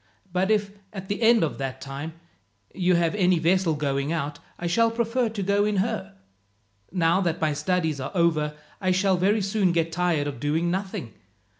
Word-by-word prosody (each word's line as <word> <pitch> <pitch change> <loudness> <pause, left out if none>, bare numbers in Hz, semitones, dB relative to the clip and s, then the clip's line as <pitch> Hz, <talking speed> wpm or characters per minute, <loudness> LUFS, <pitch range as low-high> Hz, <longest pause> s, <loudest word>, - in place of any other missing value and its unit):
"But 185 +2 +1
if, 210 -2 +1 0.2
at 190 -2 -7
the 205 +3 -2
end 230 -2 +5
of 155 - -2
that 130 -1 -4
time, 140 +4 -6 0.6
you 180 -1 +2
have 170 0 +2
any 185 -3 +3
vessel 170 0 +2
going 140 0 -1
out, 150 -3 -3 0.2
I 175 - -6
shall 230 +7 +3
prefer 230 +1 0
to 210 -2 -4
go 200 +1 +2
in 210 0 0
her. 195 - -2 0.8
Now 175 +1 +2
that 170 -2 -1
my 155 -2 +1
studies 160 -2 0
are 130 - -3
over, 155 -4 +1 0.3
I 185 - +1
shall 190 +1 +3
very 205 +4 +2
soon 195 -2 +1
get 165 -1 0
tired 165 -3 +1
of 145 -4 -5
doing 160 +5 0
nothing. 190 - -4
180 Hz, 185 wpm, -25 LUFS, 155-200 Hz, 0.8 s, end